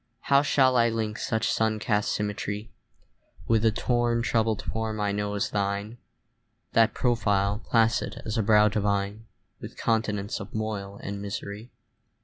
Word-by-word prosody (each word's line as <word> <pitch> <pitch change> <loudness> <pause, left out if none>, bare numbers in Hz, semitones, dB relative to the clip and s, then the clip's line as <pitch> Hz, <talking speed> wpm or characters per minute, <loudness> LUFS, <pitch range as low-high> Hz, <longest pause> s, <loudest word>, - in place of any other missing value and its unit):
How 140 - +7
shall 130 -3 +3
I 115 0 +4
link 110 -1 -3
such 110 0 0
sun 110 -1 +1
cast 105 -1 0
symmetry 105 +1 -3 0.8
With 115 -1 +3
the 115 - +4
torn 120 +1 0
troubled 110 -2 +1
form 110 -1 -3
I 105 -1 0
know 105 0 -2
as 100 - -1
thine, 100 +3 -2 0.7
That 115 -1 +4
profile, 105 -4 +1
placid 115 -1 +1
as 110 - -3
a 115 - +2
brow 105 0 +5
divine, 100 +1 -1 0.3
With - - -9
continents 110 -3 -1
of - - -9
moil 100 -2 -4
and 100 0 -5
misery? 100 +3 -6
110 Hz, 145 wpm, -27 LUFS, 100-115 Hz, 0.8 s, How